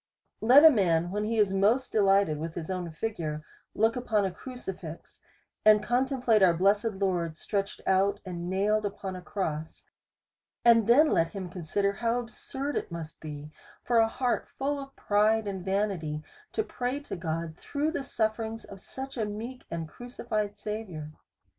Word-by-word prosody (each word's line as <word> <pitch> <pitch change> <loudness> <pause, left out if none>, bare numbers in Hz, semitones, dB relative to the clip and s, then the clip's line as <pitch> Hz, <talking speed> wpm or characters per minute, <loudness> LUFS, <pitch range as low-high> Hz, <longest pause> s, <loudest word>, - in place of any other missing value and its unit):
Let 260 +7 +8
a 320 - +11
man, 175 - +2
when 210 +1 -1
he 225 +1 -1
is 205 -3 +3
most 220 +7 +2
delighted 195 -7 +3
with 160 +1 -5
his 170 +2 -4
own 180 -2 -3
figure, 155 -4 -4 0.3
look 225 +2 +3
upon 225 -5 +1
a 190 - -1
crucifix, 185 -7 -8 0.4
and 215 -1 +6
contemplate 245 -2 +2
our 180 -3 +6
blessed 205 +5 +2
Lord 175 -5 -1
stretched 200 +1 -3
out, 195 +2 +2
and 175 -1 -5
nailed 210 +3 +1
upon 195 -2 -4
a 180 - -7
cross; 160 -4 -4 0.8
and 230 -2 +6
then 295 +7 +6
let 165 0 +2
him 190 -3 -5
consider, 195 +3 -1
how 230 +3 0
absurd 265 +4 -5
it - - -4
must 165 -2 -7
be, 150 -1 -8 0.3
for 240 - +2
a 225 - +5
heart 250 +1 -1
full 285 +1 -2
of 275 0 -9
pride 215 +2 +2
and 195 -3 -4
vanity, 190 -6 -1 0.3
to 435 - +1
pray 250 -5 -3
to 285 - -6
God, 165 -2 -3
through 295 - -2
the 290 -4 -3
sufferings 225 -2 -2
of 195 -1 -11
such 270 0 -7
a 220 - 0
meek 225 +5 -6
and 165 -1 -4
crucified 215 0 -4
Saviour. 205 -8 -5
205 Hz, 165 wpm, -29 LUFS, 175-230 Hz, 0.8 s, a